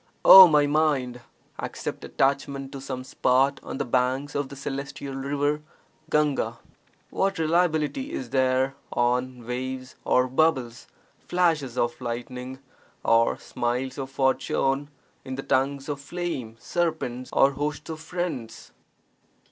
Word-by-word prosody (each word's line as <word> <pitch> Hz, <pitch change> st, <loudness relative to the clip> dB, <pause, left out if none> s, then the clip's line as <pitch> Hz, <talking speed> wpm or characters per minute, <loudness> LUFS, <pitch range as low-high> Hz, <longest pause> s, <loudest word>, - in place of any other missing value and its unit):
Oh 190 Hz, -1 st, +12 dB
my 150 Hz, -3 st, +4 dB
mind, 145 Hz, -5 st, +1 dB, 0.4 s
accept -, -, -5 dB
attachment 135 Hz, 0 st, -1 dB
to 135 Hz, -, -7 dB
some 130 Hz, -1 st, -5 dB
spot 135 Hz, +2 st, +2 dB
on -, -, -6 dB
the 140 Hz, -, -2 dB
banks 130 Hz, +3 st, 0 dB
of 140 Hz, -1 st, -2 dB
the 140 Hz, -, -9 dB
celestial 140 Hz, 0 st, -5 dB
river 145 Hz, +2 st, -1 dB, 0.5 s
(Gahga). 150 Hz, -2 st, +1 dB, 0.5 s
What 195 Hz, -1 st, 0 dB
reliability 165 Hz, -, +1 dB
is 125 Hz, -2 st, -5 dB
there 130 Hz, 0 st, +2 dB, 0.2 s
on 125 Hz, 0 st, 0 dB
waves 130 Hz, +1 st, -4 dB
or 125 Hz, 0 st, +3 dB
bubbles, 130 Hz, -4 st, 0 dB, 0.4 s
flashes 160 Hz, -8 st, +1 dB
of 120 Hz, +1 st, -1 dB
lightning 125 Hz, +2 st, -5 dB, 0.5 s
or 115 Hz, 0 st, +3 dB
(smiles 125 Hz, +3 st, -3 dB
of) 135 Hz, -1 st, -4 dB
fortune, 135 Hz, +1 st, 0 dB, 0.3 s
in 130 Hz, -, -5 dB
tongues 135 Hz, +1 st, 0 dB
of 145 Hz, -2 st, -4 dB
flame, 140 Hz, -8 st, -4 dB
serpents, 160 Hz, -8 st, -2 dB
or 135 Hz, -, +4 dB
hosts 145 Hz, +1 st, -4 dB
of 160 Hz, -, -6 dB
friends? 160 Hz, -8 st, -5 dB
135 Hz, 125 wpm, -25 LUFS, 130-150 Hz, 0.5 s, Oh